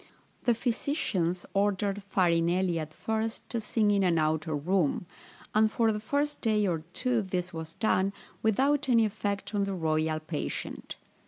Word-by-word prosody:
The 240 Hz, -2 st, +4 dB
physicians 220 Hz, -, -1 dB
ordered 200 Hz, 0 st, +1 dB
Farinelli 175 Hz, -2 st, +2 dB
at 155 Hz, -1 st, -5 dB
first 220 Hz, +7 st, -3 dB
to 235 Hz, -, -1 dB
sing 215 Hz, -1 st, +2 dB
in 200 Hz, -1 st, +3 dB
an 175 Hz, -3 st, +3 dB
outer 155 Hz, 0 st, +1 dB
room; 175 Hz, +2 st, +1 dB, 0.5 s
and 215 Hz, 0 st, +4 dB
for 225 Hz, -1 st, +2 dB
the 210 Hz, -, -2 dB
first 285 Hz, +7 st, -1 dB
day 215 Hz, -3 st, +2 dB
or 170 Hz, -4 st, 0 dB
two 250 Hz, -3 st, +1 dB
this 185 Hz, -2 st, -3 dB
was 160 Hz, 0 st, -6 dB
done, 195 Hz, -3 st, +2 dB, 0.3 s
without 270 Hz, +6 st, +2 dB
any 230 Hz, -2 st, +5 dB
effect, 205 Hz, -1 st, -3 dB
on 200 Hz, -1 st, +1 dB
the 195 Hz, -1 st, -2 dB
royal 155 Hz, -2 st, 0 dB
patient. 155 Hz, -1 st, -5 dB
195 Hz, 155 wpm, -29 LUFS, 170-220 Hz, 0.5 s, any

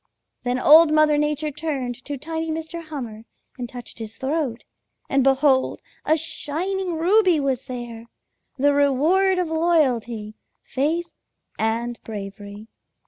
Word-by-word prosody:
"Then 245 Hz, 0 st, -1 dB
Old 310 Hz, +4 st, +7 dB
Mother 310 Hz, -1 st, +4 dB
Nature 300 Hz, +1 st, 0 dB
turned 270 Hz, -5 st, -4 dB
to 290 Hz, -1 st, -4 dB
tiny 320 Hz, +3 st, -4 dB
Mr. 320 Hz, +1 st, -4 dB
Hummer 240 Hz, -8 st, -7 dB, 0.3 s
and 245 Hz, -1 st, -4 dB
touched 245 Hz, -1 st, -9 dB
his 220 Hz, -1 st, -7 dB
throat, 270 Hz, -4 st, -2 dB, 0.4 s
and 270 Hz, -1 st, +2 dB
behold 270 Hz, 0 st, +3 dB, 0.3 s
a 315 Hz, -, +3 dB
shining 345 Hz, +4 st, -3 dB
ruby 360 Hz, 0 st, +4 dB
was 270 Hz, -2 st, -1 dB
there, 240 Hz, -3 st, -7 dB, 0.5 s
the 285 Hz, +2 st, +3 dB
reward 310 Hz, +8 st, +3 dB
of 360 Hz, -3 st, 0 dB
loyalty, 255 Hz, -10 st, +1 dB, 0.3 s
faith, 320 Hz, +6 st, -1 dB, 0.5 s
and 230 Hz, +2 st, -1 dB
bravery. 205 Hz, 0 st, -8 dB
285 Hz, 125 wpm, -23 LUFS, 240-320 Hz, 0.5 s, Old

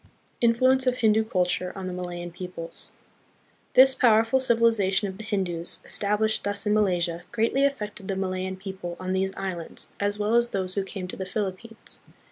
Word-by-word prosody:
Influence 255 Hz, +3 st, +4 dB
of 250 Hz, 0 st, +2 dB
Hindu 220 Hz, -2 st, +4 dB
Culture 180 Hz, -3 st, 0 dB
on 190 Hz, -1 st, -5 dB
the 185 Hz, -, -4 dB
Malayan 175 Hz, -1 st, -5 dB
Peoples. 175 Hz, -1 st, -6 dB, 0.9 s
This 265 Hz, +1 st, +8 dB
powerful 225 Hz, +1 st, +4 dB
civilization 225 Hz, -5 st, +3 dB
of 190 Hz, +1 st, -8 dB
the -, -, -6 dB
Hindus, 185 Hz, -6 st, -2 dB
established 210 Hz, +1 st, +1 dB
thus 205 Hz, +1 st, -2 dB
in 210 Hz, -, +2 dB
Malaysia, 175 Hz, -5 st, +1 dB
greatly 235 Hz, +4 st, +1 dB
affected 210 Hz, -8 st, -2 dB
the 195 Hz, -, -1 dB
Malayan 190 Hz, 0 st, -2 dB
people 190 Hz, -3 st, -6 dB
on 185 Hz, 0 st, -2 dB
these 190 Hz, 0 st, 0 dB
islands, 185 Hz, -4 st, -4 dB
as 205 Hz, 0 st, 0 dB
well 210 Hz, +2 st, 0 dB
as 235 Hz, 0 st, +4 dB
those 185 Hz, -3 st, -2 dB
who 200 Hz, -, 0 dB
came 190 Hz, -1 st, -6 dB
to -, -, -6 dB
the 190 Hz, -, -3 dB
Philip 190 Hz, -2 st, -2 dB
pines. 225 Hz, -1 st, -8 dB
200 Hz, 175 wpm, -26 LUFS, 185-225 Hz, 0.9 s, This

